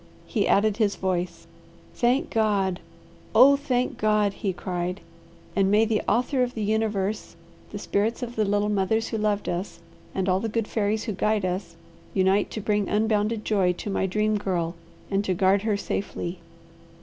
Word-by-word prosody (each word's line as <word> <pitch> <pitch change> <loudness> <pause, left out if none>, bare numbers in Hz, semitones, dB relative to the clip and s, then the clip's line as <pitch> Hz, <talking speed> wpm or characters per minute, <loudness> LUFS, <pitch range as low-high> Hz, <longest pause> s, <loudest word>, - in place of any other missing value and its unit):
He 215 -6 0
added 210 +1 +3
his 210 -3 +2
voice. 180 -2 -2 0.5
"Thank 250 +3 +1
God! 200 -4 +1 0.6
Oh, 265 +5 +8
thank 255 -3 -1
God!" 210 -2 +2
he 195 0 -2
cried. 180 0 -3 0.6
"And 195 -1 +3
may 210 +2 +4
the 220 -1 +1
Author 250 +4 +1
of 250 0 0
the 220 - -2
Universe, 210 -2 -1 0.3
the 205 - -6
spirits 210 +4 -1
of 240 0 -5
the 220 - +2
little 205 0 +1
mothers 210 +2 +1
who 225 - -2
loved 210 -1 0
us, 180 +3 -3 0.4
and 190 -1 0
all 185 0 +3
the 225 +2 -2
good 225 0 -1
fairies 215 0 0
who 225 - -3
guide 210 +1 +1
us, 180 -1 -3 0.4
unite 190 +1 +3
to 215 - -5
bring 205 -1 0
unbounded 215 +1 +1
joy 190 -4 +2
to 200 +3 -5
my 195 - 0
Dream 215 +2 +1
Girl 175 -4 -1 0.4
and 195 +1 +1
to 190 -3 0
guard 190 +2 +3
her 210 -1 0
safely." 190 -3 -4
205 Hz, 175 wpm, -25 LUFS, 190-220 Hz, 0.6 s, Oh